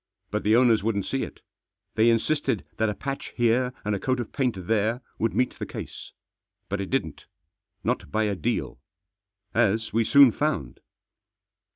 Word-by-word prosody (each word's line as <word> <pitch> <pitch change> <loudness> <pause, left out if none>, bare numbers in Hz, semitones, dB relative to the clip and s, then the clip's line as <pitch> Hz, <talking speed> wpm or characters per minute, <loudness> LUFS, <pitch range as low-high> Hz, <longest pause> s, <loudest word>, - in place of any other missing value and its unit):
But 105 +1 -1
the 110 +2 +3
owners 120 -3 +5
wouldn't 100 -2 -1
see 135 - -1
it. - - -6 0.5
They 110 +1 +4
in 115 - +5
sisted 150 +6 -1
that 110 -1 +2
a 105 - -3
patch 135 0 -4
here, 120 +1 +2
and 105 - 0
a 100 - -1
coat 130 +3 0
of 120 - -4
paint 120 -10 -1
there, 110 +3 +1 0.2
would 115 - 0
meet 125 0 0
the - - -3
case. - - -8 0.6
But 100 0 -1
it 95 - -5
didn't. 130 - -2 0.6
Not - - -1
by 110 - +1
a 105 -1 0
deal. 100 - -2 0.7
As 110 -1 +1
we 115 +1 +3
soon 140 +2 +7
found. 105 - -2
115 Hz, 175 wpm, -26 LUFS, 105-125 Hz, 0.7 s, soon